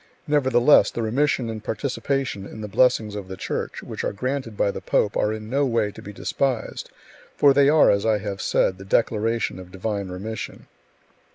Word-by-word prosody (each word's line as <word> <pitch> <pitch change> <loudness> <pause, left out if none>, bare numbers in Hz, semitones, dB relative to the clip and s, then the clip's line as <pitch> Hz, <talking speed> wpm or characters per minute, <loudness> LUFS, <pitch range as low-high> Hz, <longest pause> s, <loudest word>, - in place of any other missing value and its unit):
Nevertheless, 145 -3 +4
the 115 - -4
remission 125 +2 +1
and 110 -1 -6
participation 130 -2 -2
[in 110 - -9
the 105 - -4
blessings 110 0 +2
of 100 -2 -6
the 95 0 -7
Church] - - -4
which - - -6
are - - 0
granted 130 0 -3
by 100 - +2
the 95 - -7
pope 100 +2 +1
are 105 - +1
in 110 0 -6
no 140 +5 +1
way 115 -5 +1
to - - -12
be 105 - -9
despised, 125 +3 -2 0.5
for 140 -1 +6
they 140 0 +5
are, 155 0 +6
as 100 0 +1
I 110 -1 +2
have 100 -2 -5
said, 95 -1 +1
the - - -8
declaration 110 +1 0
of 90 -1 -11
divine 100 +1 -3
remission. 105 +5 -6
110 Hz, 190 wpm, -23 LUFS, 100-130 Hz, 0.5 s, for